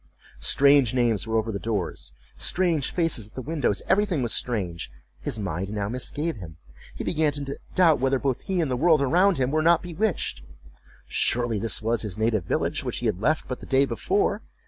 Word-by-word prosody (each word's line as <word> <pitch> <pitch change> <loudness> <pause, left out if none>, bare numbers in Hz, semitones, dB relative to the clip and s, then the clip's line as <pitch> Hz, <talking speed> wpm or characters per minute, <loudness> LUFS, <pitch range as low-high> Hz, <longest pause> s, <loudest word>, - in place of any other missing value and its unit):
Strange 135 - +4
names 115 -4 +1
were 110 0 0
over 110 0 -1
the 100 - -4
doors—strange 110 - -1
faces 165 - +1
at 110 - -23
the 130 - -4
windows—every 160 - +1
thing 175 -10 -1
was 120 - -1
strange. 95 -9 -2 0.3
His - - -2
mind 95 -2 -3
now 105 -1 -2
misgave 145 +5 -2
him; 85 -5 -10 0.4
he - - -5
began 155 -2 +1
to 140 -1 -4 0.2
doubt 170 -6 +5
whether 135 +1 +2
both 130 -1 -2
he 190 -2 -2
and 150 -5 -1
the - - +1
world 155 +2 +3
around 180 +7 +3
him 130 0 0
were 155 +1 +1
not 165 +1 +4
bewitched. 180 +3 -2 0.7
Surely 120 -3 +1
this 110 +1 -2
was 115 +1 0
his 105 -4 -4
native 110 -4 0
village, - - -1
which - - -3
he - - -4
had 90 - -1
left 155 +7 +1
but 125 - -5
the - - -11
day 135 +1 +3
before. 400 - 0
130 Hz, 190 wpm, -25 LUFS, 110-160 Hz, 0.7 s, doubt